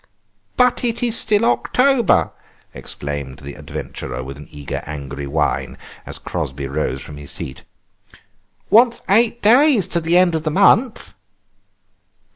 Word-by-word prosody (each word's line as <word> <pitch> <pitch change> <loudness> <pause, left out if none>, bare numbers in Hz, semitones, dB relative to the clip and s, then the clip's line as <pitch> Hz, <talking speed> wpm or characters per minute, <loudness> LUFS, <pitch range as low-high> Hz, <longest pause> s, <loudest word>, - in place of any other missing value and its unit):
"But 250 0 +3
it 235 0 -1
is 235 -2 +2
still 215 0 +3
October!" 250 -1 +2 0.4
exclaimed 70 -2 -5
the 70 0 -9
adventurer 65 - -7
with 70 +1 -8
an 75 - -12
eager, 75 -2 -6
angry 70 -1 -6
whine, 75 +1 -1 0.3
as - - -6
Crosby 70 +1 -5
rose 70 -1 -3
from 75 - -10
his 75 -1 -10
seat; 65 - -7 1.1
"wants 235 +2 +4
eight 230 +3 +3
days 245 - +5
to 170 - -1
the 165 +2 +2
end 180 -2 +4
of 160 - -1
the 155 - -2
month!" 205 - +2
165 Hz, 135 wpm, -19 LUFS, -, 1.1 s, days